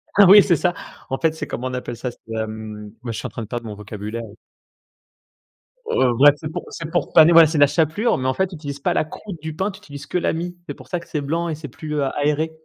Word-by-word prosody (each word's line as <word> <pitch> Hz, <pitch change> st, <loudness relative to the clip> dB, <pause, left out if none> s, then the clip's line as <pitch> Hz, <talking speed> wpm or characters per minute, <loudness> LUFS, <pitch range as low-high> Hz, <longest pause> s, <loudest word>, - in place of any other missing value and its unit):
Ah 200 Hz, -, +8 dB
oui, 205 Hz, +3 st, +10 dB
c'est 175 Hz, -, +3 dB
ça! 175 Hz, +3 st, +1 dB, 0.4 s
En 135 Hz, -, -1 dB
fait, 160 Hz, -1 st, +2 dB
c'est 160 Hz, -, -6 dB
comment 125 Hz, +2 st, -4 dB
on 130 Hz, -, -5 dB
appelle 125 Hz, -2 st, -5 dB
ça? 125 Hz, +2 st, -3 dB
C'est, -, -, -22 dB, 0.2 s
hem, 110 Hz, -1 st, -6 dB
moi, 120 Hz, -, -4 dB
je 110 Hz, -, -5 dB
suis -, -, -6 dB
en -, -, -9 dB
train -, -, -7 dB
de -, -, -9 dB
perdre 120 Hz, +2 st, -5 dB
mon 105 Hz, -, -6 dB
vocabulaire. 105 Hz, +2 st, -6 dB, 1.6 s
Heu, 130 Hz, -, +2 dB
bref, 145 Hz, +4 st, +7 dB
c'est 155 Hz, +1 st, -6 dB
pour 175 Hz, +1 st, -5 dB
c'est 165 Hz, -1 st, -7 dB
pour 175 Hz, -, -1 dB
paner 160 Hz, 0 st, +8 dB
ouais, 165 Hz, -1 st, +9 dB
c'est 155 Hz, +1 st, -2 dB
la 145 Hz, 0 st, +7 dB
chapelure 165 Hz, -, +1 dB
mais 130 Hz, -, -2 dB
en 130 Hz, -, +2 dB
fait, 190 Hz, +8 st, 0 dB
tu 180 Hz, -, -10 dB
utilises 145 Hz, -3 st, -6 dB
pas -, -, 0 dB
la -, -, +2 dB
croute 170 Hz, +1 st, -9 dB
du 160 Hz, 0 st, -5 dB
pain, 190 Hz, +5 st, -1 dB
tu 190 Hz, -, -12 dB
utilises 145 Hz, -7 st, -10 dB
que 160 Hz, -, -2 dB
la 180 Hz, -, 0 dB
mie. 175 Hz, +2 st, -4 dB
C'est -, -, -4 dB
pour -, -, -15 dB
ça 175 Hz, -, -2 dB
que 170 Hz, -, -15 dB
c'est 150 Hz, -, -3 dB
blanc 165 Hz, +4 st, -2 dB
et 160 Hz, -, -2 dB
c'est 150 Hz, 0 st, -8 dB
plus, 150 Hz, +5 st, -7 dB
heu, 145 Hz, -, +1 dB
aéré, 150 Hz, +2 st, +1 dB
150 Hz, 280 wpm, -21 LUFS, 125-170 Hz, 1.6 s, oui